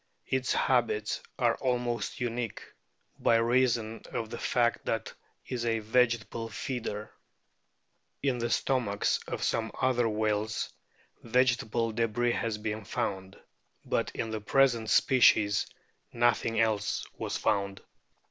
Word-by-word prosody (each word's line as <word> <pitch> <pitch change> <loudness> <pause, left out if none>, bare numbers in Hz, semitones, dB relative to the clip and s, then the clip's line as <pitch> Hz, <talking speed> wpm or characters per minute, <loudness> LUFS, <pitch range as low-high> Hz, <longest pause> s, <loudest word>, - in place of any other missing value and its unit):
* - - -48
Its 130 -1 0
habits 115 -4 +1 0.2
are 120 -2 +3
almost 125 -2 -1
unique 120 -2 -3 0.6
by 115 - +4
reason 115 -1 +2
of 115 -2 -3
the 120 - -4
fact 120 -1 +1
that 115 - -2 0.3
it - - -7
is 120 -2 -2
a 115 -1 +1
vegetable 115 0 +1
feeder. 110 -2 -4 1.1
In 130 -3 +1
the 120 0 -1
stomachs 115 -6 +1
of - - -4
some 115 0 0
other 120 -3 +2
whales 110 0 -1 0.5
vegetable 120 -1 +1
debris 115 +2 +1
has 115 -2 -1
been 105 0 -4
found; 95 0 -3 0.5
but - - 0
in 115 - -3
the 110 -1 -3
present 120 -1 +3
species 105 -4 +4 0.4
nothing 120 -1 +2
else 110 -2 +1
was - - -2
found. 100 -1 -1
115 Hz, 125 wpm, -29 LUFS, 110-120 Hz, 1.1 s, by